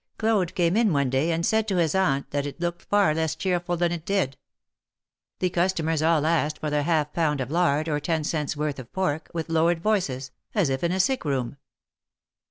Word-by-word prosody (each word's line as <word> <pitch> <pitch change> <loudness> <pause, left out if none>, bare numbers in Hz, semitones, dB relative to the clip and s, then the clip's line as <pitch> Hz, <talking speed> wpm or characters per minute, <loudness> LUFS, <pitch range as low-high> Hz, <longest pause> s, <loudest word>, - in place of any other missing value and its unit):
Claude 215 -6 +1
came 175 0 +2
in 225 -3 +3
one 140 -4 +1
day, 135 +6 +1
and 165 +1 0
said 220 0 +1
to 195 - 0
his 165 -4 +2
aunt 165 -8 +1
that 145 0 -1
it 145 - -8
looked 175 0 -2
far 205 -6 +2
less 160 0 -1
cheerful 175 -2 -1
than 175 0 +1
it 170 -2 -4
did. 185 -9 0 1.0
The 180 -1 0
customers 165 -3 0
all 160 -1 +3
asked 155 -2 +1
for 155 -1 -3
their 150 0 +1
half 150 -1 0
pound 150 -4 +1
of 130 +1 -3
lard, 155 -3 +2
or 150 -2 0
ten 160 +1 -1
cents' 150 -1 -2
worth 150 -2 -2
of 125 -2 -10
pork, 180 -5 -2
with 165 -2 -2
lowered 165 +1 +2
voices, 140 -12 0 0.2
as 195 -9 +2
if 130 +3 -2
in 170 - +1
a 190 - -1
sick 260 +7 +1
room. 135 -3 -2
165 Hz, 210 wpm, -25 LUFS, 150-180 Hz, 1.0 s, in